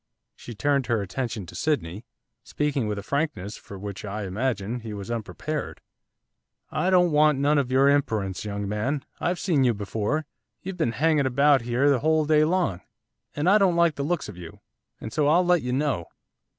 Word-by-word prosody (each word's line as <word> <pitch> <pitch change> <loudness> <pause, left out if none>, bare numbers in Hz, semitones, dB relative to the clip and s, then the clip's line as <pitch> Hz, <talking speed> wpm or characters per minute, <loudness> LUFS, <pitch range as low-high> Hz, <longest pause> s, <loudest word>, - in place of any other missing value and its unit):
She 120 - -10
turned 140 +2 +1
her 115 -4 +1
attention 110 +1 -4
to - - -12
Sydney, 110 - -2 0.4
speaking 145 -6 -1
with 105 -1 -2
a 100 - -5
frankness 110 - -2
for 100 - -11
which, 100 0 -7
I 105 0 -4
imagine, 110 +2 -2
he 110 -2 -7
was 100 +2 -6
unprepared. 135 +6 -4 0.9
'I 180 - 0
don't 180 -2 +4
want 150 -1 +4
none 145 +2 +3
of 135 -3 -1
your 135 +2 +4
imperence, 110 -9 0
young 100 -1 -4
man. 120 +8 -2
I've 175 +1 0
seen 160 -8 +2
you 120 -3 +2
before, 105 +9 -2 0.4
you've 190 0 -5
been 115 - 0
hanging 150 +1 +2
about 140 +1 +4
here 120 +4 +1
the 140 -3 +4
whole 155 +2 +2
day 155 0 +4
long! 155 - 0 0.5
and 150 +3 -1
I 205 +3 +6
don't 190 -4 +3
like 170 -1 +3
the 140 - -5
looks 170 +5 -1
of 105 -4 -10
you, 85 -1 -11 0.4
and 110 - -7
so 150 -2 +2
I'll 170 +4 +4
let 175 -2 +3
you 125 - -3
know. 130 - -1
135 Hz, 190 wpm, -25 LUFS, 105-150 Hz, 0.9 s, I